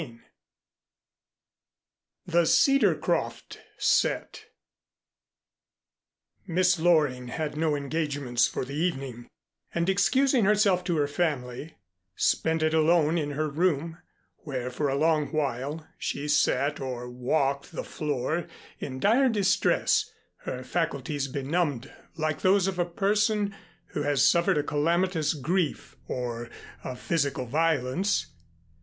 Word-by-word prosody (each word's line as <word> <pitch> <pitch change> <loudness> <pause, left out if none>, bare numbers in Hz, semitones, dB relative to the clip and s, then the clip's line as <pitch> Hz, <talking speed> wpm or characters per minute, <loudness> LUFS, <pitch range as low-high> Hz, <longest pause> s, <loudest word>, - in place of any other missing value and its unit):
XI 120 -7 -9 2.1
THE 170 -1 +2
CEDARCROFT 275 0 +2 0.2
SET - - 0 2.0
Miss 180 0 +2
Loring 150 -7 +2
had 150 +4 -4
no 155 -1 +1
engagements 140 -4 0
for - - -4
the 140 - -8
evening, 135 -7 -3 0.5
and 170 0 0
excusing 255 +6 +3
herself 200 -3 +3
to 175 -3 0
her 145 - +2
family, 145 -2 -3 0.4
spent 160 0 +1
it 155 0 +1
alone 160 0 +3
in 145 -2 -3
her 155 +2 -1
room, 165 +1 -1 0.4
where 130 -4 -5
for 145 +2 -1
a 135 - 0
long 155 0 +2
while 145 +1 -3
she 140 +1 -3
sat 145 0 +2
or 125 -2 -5
walked 135 +4 -1
the - - -5
floor, 150 +2 -2 0.3
in 130 -1 -5
dire 245 - +4
distress, 205 -4 +2 0.3
her 130 0 -6
faculties 145 -3 -2
benumbed 140 -1 -2 0.2
like 155 -1 -2
those 190 0 +4
of 190 -2 -2
a 175 - +2
person 205 +3 +1 0.4
who 150 - -3
has 145 -2 +2
suffered 170 0 +3
a 145 - +1
calamitous 165 +2 +1
grief 170 +3 -2
or 120 -2 -4 0.3
a 130 - -5
physical 140 -1 -1
violence. 160 - 0
155 Hz, 115 wpm, -27 LUFS, 140-175 Hz, 2.1 s, dire